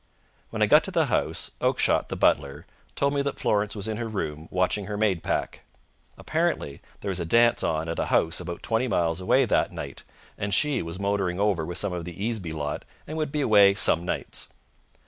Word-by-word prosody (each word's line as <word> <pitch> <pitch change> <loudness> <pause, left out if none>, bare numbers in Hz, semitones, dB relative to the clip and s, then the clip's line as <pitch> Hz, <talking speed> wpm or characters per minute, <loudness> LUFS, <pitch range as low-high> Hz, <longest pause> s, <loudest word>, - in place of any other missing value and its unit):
When - - -1
I - - +6
got - - +6
to - - -3
the - - +2
house, - - 0
Oakshott, - - +2
the - - -3
butler, 70 +3 +1 0.3
told 140 0 +1
me 140 - +1
that 140 0 -3
Florence 105 +1 0
was 100 0 -3
in 110 -1 -3
her 115 0 -3
room, 80 -7 -4
watching 90 +2 0
her 105 -1 -4
maid 100 -6 +1
pack. - - -2 0.6
Apparently 70 - -2 0.2
there - - -3
was 95 -1 -2
a - - -1
dance 115 +7 +4
on 80 0 -1
at 80 - -3
a - - -1
house 80 +1 +2
about 85 -1 -6
twenty 115 +2 0
miles 85 -4 0
away 90 - +3
that - - +1
night, 70 -1 -7 0.4
and 100 -1 +1
she 145 -4 +2
was 85 +1 -6
motoring 100 -2 -1
over 100 -5 +1
with 90 0 -4
some 90 - -1
of 85 -1 -4
the 85 +1 -9
Easeby 105 -6 -2
lot 75 -2 -4 0.2
and 155 - -6
would 155 -3 -2
be 150 - -1
away 100 -5 +6
some 85 -4 +3
nights. 90 - -4
100 Hz, 210 wpm, -26 LUFS, 85-110 Hz, 0.6 s, I